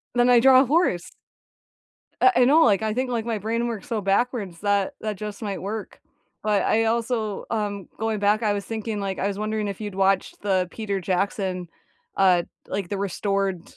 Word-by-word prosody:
Then 245 Hz, 0 st, +4 dB
I 245 Hz, -1 st, +7 dB
draw 260 Hz, +1 st, +7 dB
a 270 Hz, -, +2 dB
horse. 280 Hz, -, +1 dB, 1.1 s
Uh, 385 Hz, -, +7 dB
I 250 Hz, -, +6 dB
know, 305 Hz, +6 st, +5 dB
like, 205 Hz, -2 st, +3 dB
I 215 Hz, -1 st, 0 dB
think, 255 Hz, 0 st, -1 dB
like, 230 Hz, -2 st, -1 dB
my 230 Hz, -2 st, -2 dB
brain 230 Hz, +3 st, -1 dB
works 225 Hz, -4 st, -5 dB
so 225 Hz, -2 st, -1 dB
backwards, 195 Hz, -3 st, -1 dB
that 205 Hz, +4 st, +1 dB
that 215 Hz, -2 st, -3 dB
just 210 Hz, +1 st, -7 dB
might 200 Hz, -3 st, -4 dB
work. 210 Hz, +2 st, -6 dB, 0.4 s
But 210 Hz, -2 st, +2 dB
I 225 Hz, +1 st, +2 dB
also, 225 Hz, -2 st, -1 dB
um, 205 Hz, -4 st, -3 dB
going 220 Hz, -1 st, -1 dB
back, 205 Hz, +2 st, +2 dB
I 210 Hz, -1 st, +2 dB
was 200 Hz, -1 st, -3 dB
thinking, 220 Hz, -1 st, -4 dB
like, 195 Hz, -1 st, -3 dB
I 195 Hz, -, 0 dB
was 200 Hz, 0 st, -2 dB
wondering 215 Hz, -1 st, -2 dB
if 200 Hz, +1 st, -6 dB
you'd 205 Hz, -3 st, -5 dB
watched 195 Hz, 0 st, +1 dB
the 185 Hz, -3 st, +1 dB
Peter 205 Hz, -3 st, -3 dB
Jackson, 185 Hz, -1 st, -1 dB, 0.5 s
uh, 185 Hz, -3 st, +4 dB, 0.3 s
like, 195 Hz, -4 st, -3 dB
the 200 Hz, -, -3 dB
restored, 195 Hz, -1 st, -1 dB
210 Hz, 195 wpm, -24 LUFS, 195-225 Hz, 1.1 s, I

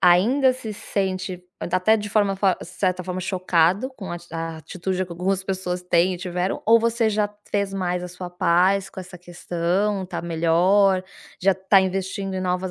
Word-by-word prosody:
ainda 235 Hz, +10 st, +5 dB
se 230 Hz, -4 st, -7 dB
sente 190 Hz, -4 st, -3 dB, 0.3 s
da 180 Hz, -, +1 dB
até 220 Hz, +5 st, +4 dB
de 210 Hz, -1 st, -4 dB
forma 200 Hz, -2 st, +2 dB
fa 190 Hz, -1 st, +3 dB
de -, -, -8 dB
certa 185 Hz, 0 st, -1 dB
forma 185 Hz, 0 st, -4 dB
chocado 185 Hz, +4 st, +1 dB
com 190 Hz, -4 st, -6 dB
a -, -, -3 dB
a 165 Hz, 0 st, -4 dB
atitude 185 Hz, +4 st, -3 dB
que 180 Hz, -, -17 dB
algumas 185 Hz, +2 st, -1 dB
pessoas 185 Hz, -2 st, -3 dB
têm 180 Hz, +1 st, +2 dB
e -, -, -5 dB
tiveram, 180 Hz, +1 st, -3 dB
ou 230 Hz, +1 st, +6 dB
você 230 Hz, -1 st, +1 dB
já 210 Hz, 0 st, +1 dB, 0.2 s
fez 200 Hz, -1 st, 0 dB
mais 180 Hz, -2 st, -1 dB
a -, -, -4 dB
sua 180 Hz, 0 st, -8 dB
paz 180 Hz, +3 st, +2 dB
com -, -, -8 dB
essa 180 Hz, -1 st, -11 dB
questão, 180 Hz, +3 st, -1 dB
tá 180 Hz, -, -5 dB
melhor, 180 Hz, +4 st, +3 dB, 0.4 s
já 195 Hz, +1 st, +5 dB
tá 190 Hz, +1 st, +4 dB
investindo 190 Hz, +1 st, -2 dB
em 185 Hz, -, -2 dB
novas 180 Hz, 0 st, -1 dB
185 Hz, 190 wpm, -23 LUFS, 180-195 Hz, 0.4 s, ou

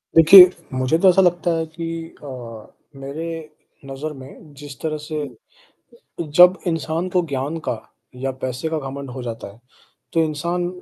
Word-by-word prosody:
देखिए, 180 Hz, +3 st, +10 dB, 0.2 s
मुझे 130 Hz, +5 st, +1 dB
तो 190 Hz, -, +8 dB
ऐसा 190 Hz, +2 st, +5 dB
लगता 175 Hz, -1 st, +2 dB
है 160 Hz, -, -2 dB
कि 165 Hz, +1 st, -8 dB, 0.4 s
अ, -, -, -8 dB, 0.7 s
मेरे 140 Hz, +4 st, -6 dB, 0.6 s
नज़र 140 Hz, +3 st, -6 dB
में 140 Hz, +2 st, -13 dB
जिस 140 Hz, -2 st, -11 dB
तरह 155 Hz, -1 st, -2 dB
से 155 Hz, -1 st, -4 dB, 1.2 s
जब 180 Hz, +1 st, +8 dB
इंसान 165 Hz, +2 st, -2 dB
को 180 Hz, -1 st, +2 dB
ज्ञान 140 Hz, +3 st, -3 dB
का 115 Hz, -, -1 dB, 0.5 s
या 135 Hz, -, -1 dB
पैसे 130 Hz, +5 st, -3 dB
का 160 Hz, -1 st, -2 dB
घमंड 140 Hz, -1 st, -7 dB
हो 130 Hz, 0 st, -7 dB
जाता 115 Hz, -3 st, -6 dB
है 110 Hz, -, -20 dB, 0.6 s
तो 165 Hz, -1 st, +3 dB
इंसान 170 Hz, +3 st, -2 dB
155 Hz, 155 wpm, -21 LUFS, 135-170 Hz, 1.2 s, देखिए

